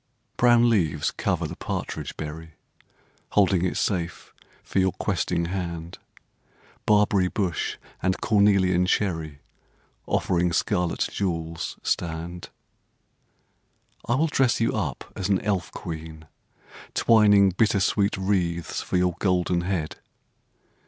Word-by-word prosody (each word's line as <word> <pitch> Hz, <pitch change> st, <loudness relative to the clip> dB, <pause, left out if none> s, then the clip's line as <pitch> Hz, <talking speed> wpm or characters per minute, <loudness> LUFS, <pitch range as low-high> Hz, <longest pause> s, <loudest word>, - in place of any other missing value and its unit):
Brown 120 Hz, -1 st, +5 dB
leaves 80 Hz, -10 st, +1 dB
cover -, -, -1 dB
the -, -, -5 dB
partridge -, -, -5 dB
berry, 80 Hz, +1 st, -7 dB, 0.4 s
\ -, -, -37 dB
Holding 95 Hz, -3 st, +3 dB
it 95 Hz, -, -1 dB
safe 85 Hz, -4 st, -2 dB, 0.3 s
for -, -, -1 dB
your 95 Hz, -1 st, +2 dB
questing 85 Hz, -, -1 dB
hand. 85 Hz, -2 st, -5 dB, 0.9 s
Barberry 105 Hz, -3 st, +4 dB
bush 90 Hz, -5 st, -2 dB, 0.2 s
and 95 Hz, +1 st, 0 dB
cornelian 100 Hz, -4 st, +3 dB
cherry 80 Hz, -8 st, -1 dB, 0.7 s
Offering 85 Hz, 0 st, +1 dB
scarlet 90 Hz, +1 st, 0 dB
jewels 85 Hz, -4 st, -3 dB
stand. 85 Hz, +1 st, -3 dB, 1.6 s
I 120 Hz, -, +3 dB
will 155 Hz, +5 st, +2 dB
dress 135 Hz, -5 st, +2 dB
you 115 Hz, -, +1 dB
up 80 Hz, -, -3 dB
as 95 Hz, -, -3 dB
an 95 Hz, -2 st, +3 dB
elf 100 Hz, -4 st, -1 dB
queen, 80 Hz, -2 st, -7 dB, 0.7 s
twining 105 Hz, -3 st, +5 dB
Bittersweet 100 Hz, 0 st, +2 dB
wreaths 90 Hz, -4 st, -1 dB
for -, -, -1 dB
your 90 Hz, 0 st, +2 dB
golden 90 Hz, -2 st, +1 dB
head. 85 Hz, -3 st, -3 dB
90 Hz, 110 wpm, -25 LUFS, 85-100 Hz, 1.6 s, Brown